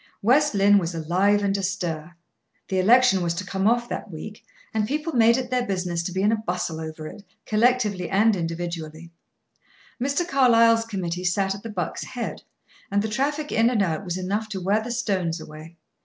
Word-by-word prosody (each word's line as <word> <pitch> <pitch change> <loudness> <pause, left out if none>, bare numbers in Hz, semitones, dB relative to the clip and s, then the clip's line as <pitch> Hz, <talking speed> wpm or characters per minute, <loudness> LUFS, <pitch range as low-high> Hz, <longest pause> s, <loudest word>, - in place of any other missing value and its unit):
West 275 +3 +3
Lynne 200 +1 +5
was 170 -2 -3
alive 185 +6 +2
and 200 0 +1
astir. 175 -4 -3 0.5
The 190 - 0
election 225 0 +5
was 170 -1 -1
to 185 - -4
come 190 +1 -1
off 240 +1 +2
that - - -5
week, - - -9 0.3
and 215 -1 0
people 305 +5 -2
made 235 0 +5
it 255 -1 -4
their 250 -1 +1
business 180 -6 -2
to 170 - -4
be 190 +2 -1
in 210 - +4
a 225 - +1
bustle 175 -5 -3
over 155 0 -7
it, 200 +6 -9 0.2
collectively 215 -5 +1
and 210 +3 +3
individually. 165 -1 -5 0.9
Mr. 280 +7 0
Carlyle's 230 -5 +4
committee 180 -5 -4
sat 190 +2 +1
at 200 - -9
the 230 - -7
Buck's 180 -6 -4
Head, 245 -2 -5 0.5
and 200 +1 +1
the - - -1
traffic 290 +6 -1
in 225 +2 +3
and 225 -5 +2
out 170 +1 -2
was 180 -1 -3
enough 205 +4 -2
to 195 - -4
wear 200 +4 +1
the 230 - -6
stones 190 -9 -1
away. 155 +2 -11
200 Hz, 190 wpm, -24 LUFS, 175-230 Hz, 0.9 s, Lynne